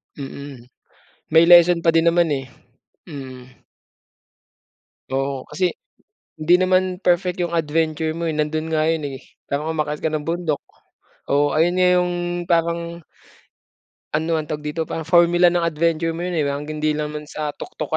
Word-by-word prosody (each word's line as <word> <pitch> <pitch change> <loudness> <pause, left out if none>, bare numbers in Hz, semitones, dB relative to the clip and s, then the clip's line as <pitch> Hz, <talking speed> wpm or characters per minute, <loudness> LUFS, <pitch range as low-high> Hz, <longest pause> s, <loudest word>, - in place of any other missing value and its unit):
Mm, 140 -2 -8 0.7
may 160 +1 +6
lesson 175 0 +6
pa 165 - +4
din 165 0 +4
naman, 170 -2 +2
eh. 135 -2 -3 0.6
Mm. 130 -5 -9 1.7
Oo, 135 -1 -2
kasi 180 -1 0 0.7
hindi 170 +3 +5
naman 185 0 +1
perfect 180 0 +2
'yung 175 -1 -2
adventure 160 0 0
mo, 170 - -3
eh, 160 - -1
nando'n 155 +1 -1
nga 155 +1 +2
'yun, 160 -2 0
eh, 130 - -9 0.2
kaya 140 +1 -2
umakyat 150 -2 -2
ka 160 - 0
ng 155 -1 -3
bundok. 165 -3 -1 0.7
Oo, 145 +1 +2
ayun 165 +5 +2
nga 185 0 +3
'yung 180 0 +1 0.4
parang 170 0 -1 1.1
Ano 160 +1 0
ang 155 - -3
tawag 150 0 -5
dito, 150 +2 -3
parang 160 0 -5
formula 175 0 +5
ng 170 -1 0
adventure 165 0 0
mo 170 - -5
'yun, 180 -1 -2
eh, 150 - +1
hanggang 145 +2 -4
hindi 155 0 +1
naman 150 0 -4
sa 150 0 -4
tuktok 370 - -7
160 Hz, 155 wpm, -21 LUFS, 150-170 Hz, 1.7 s, may